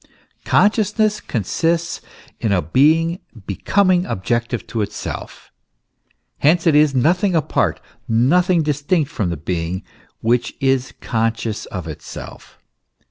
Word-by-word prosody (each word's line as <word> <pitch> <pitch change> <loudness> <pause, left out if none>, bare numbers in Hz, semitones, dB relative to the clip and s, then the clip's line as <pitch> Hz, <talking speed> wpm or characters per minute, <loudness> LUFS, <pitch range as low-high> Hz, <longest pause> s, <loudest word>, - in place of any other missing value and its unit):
Consciousness 210 0 +2
consists 165 - -1 0.4
in 110 - 0
a 90 -3 +2
being 160 - +3 0.3
becoming 185 - +2
objective 120 +4 -2
to 115 -2 -3
itself; 105 - -6 0.9
hence 165 +4 +3
it 165 - +5
is 150 -1 +4
nothing 180 +8 +2
apart, 160 - +1 0.3
nothing 165 - +3
distinct 150 +1 0
from 105 - -1
the 85 - -3
being 85 +3 -3 0.4
which 120 +2 +1
is 135 -1 +1
conscious 115 -1 -2
of 90 -5 -6
itself. 80 - -9
140 Hz, 110 wpm, -20 LUFS, 110-170 Hz, 0.9 s, it